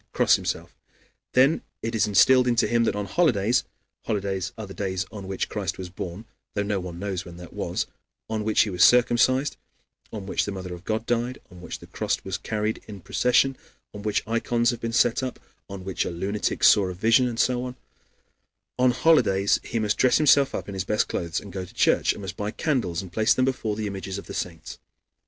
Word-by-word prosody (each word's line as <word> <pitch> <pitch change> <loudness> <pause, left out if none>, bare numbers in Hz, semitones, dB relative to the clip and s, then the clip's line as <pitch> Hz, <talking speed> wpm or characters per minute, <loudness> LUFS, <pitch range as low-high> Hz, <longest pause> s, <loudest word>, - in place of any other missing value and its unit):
cross - - +5
himself. - - -4 0.6
Then 135 +5 +4 0.2
it 115 - -2
is 110 -2 +2
instilled 125 +5 +5
into 120 -1 +3
him 120 -1 +2
that - - 0
on 105 0 -2
holidays 120 - +2 0.4
(holidays 95 -3 -2
are 110 - -5
the 95 - -10
days 95 -2 -2
on 100 -3 -8
which 95 0 -2
Christ 95 -4 -3
was 95 -1 -6
born, 90 +4 -6 0.3
though 105 - +1
no 100 -1 -1
one 90 -2 -7
knows 95 -1 -3
when 85 -2 -11
that 90 -2 -11
was, - - -2 0.4
on 110 -1 -2
which 110 0 +3
he 105 - +1
was 90 0 +3
circumcised, 125 +3 +4 0.5
on 105 -3 -6
which 95 - 0
the 100 - -4
Mother 95 -2 -6
of 90 +1 -10
God 110 +1 -1
died, 120 +2 -1
on 90 -1 -13
which - - -6
the - - -13
cross - - -2
was 95 -1 -4
carried 110 0 -2
in 100 -3 -9
procession, 125 +8 +2 0.4
on 105 - -8
which 105 +1 -1
ikons 115 +1 +1
have 120 - -7
been 115 - -2
set 120 +2 +3
up, 130 -1 -4 0.3
on 100 -2 -7
which 95 -2 -1
a - - -3
lunatic 95 +5 -2
saw 100 -2 +6
a 90 - -5
vision, 115 +6 +4
and 115 -2 -4
so 125 -1 +2
on) 125 0 -6 1.0
on 125 0 +5
holidays 120 -7 +3
he 115 - -4
must 105 -2 0
dress 130 - +5
himself 145 -2 +4
in 100 - -6
his 95 -1 -2
best 105 +3 0
clothes 85 0 -2
and 100 - -11
go 95 -1 -4
to 90 - -13
church, - - +3
and - - -7
must 95 - -5
buy 105 0 -3
candles 105 - -1
and 90 -2 -11
place 110 +4 +3
them 130 - +2
there 135 - +3
before 110 -4 -3
the 110 0 -3
images 100 -1 -4
of 100 - -8
the - - -8
saints. 85 -3 -6
105 Hz, 220 wpm, -25 LUFS, 95-120 Hz, 1.0 s, saw